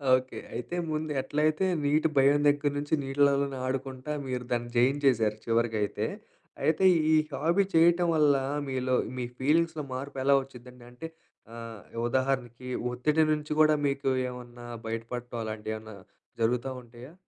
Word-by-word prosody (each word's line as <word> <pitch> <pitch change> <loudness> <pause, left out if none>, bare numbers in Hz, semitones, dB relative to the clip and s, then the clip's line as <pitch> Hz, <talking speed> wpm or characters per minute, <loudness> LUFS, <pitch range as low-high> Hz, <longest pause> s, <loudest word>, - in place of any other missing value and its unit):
Okay. 130 0 -4 0.2
అయితే 120 +8 -4 0.2
ముందు 155 0 -2
ఎట్లైతే 155 +5 +1 0.2
నీటి 150 +3 +3
భయం 140 +2 +5
దగ్గర 145 0 +1
నుంచి 145 +2 -3
నీళ్ళలోనే 140 0 +2
ఆడుకుంటా, 130 +2 -4 0.2
మీరు 125 -1 -3
దాన్ని 120 0 -1
జయించేశారు 125 -4 +3
చివరికైతే. 115 -2 0 0.6
అయితే, 160 +4 +2 0.3
ఈ - - +6 0.2
హాబీ 170 +8 +2
చేయటం 170 +2 +5
వల్ల, 150 -2 +4 0.3
మీలో 130 -1 0 0.2
మీ 125 - -2
ఫీలింగ్స్‌లో 160 +3 +1
మార్పు 135 +2 -6
ఎలా 140 +1 +4
వచ్చిద్దండి? 125 -2 -13
అంటే, 140 +7 -8 0.5
ఆహ్, 115 -2 -8 0.3
ఉదాహరణకి 125 -1 -1 0.2
ఒత్తిడి 150 +6 +2
నుంచి 150 0 -4
కూడా, 155 0 +5
మీకు 140 0 -1 0.2
ఏమన్నా 120 -1 -10 0.2
బయటపడటం 120 +1 -5
అలాంటివి 110 0 -4
ఏమన్నా, 110 -1 -11 0.5
జరుగుతా 120 +3 +1
ఉంటాయా? 120 +4 -13
130 Hz, 130 wpm, -28 LUFS, 120-150 Hz, 0.6 s, ఈ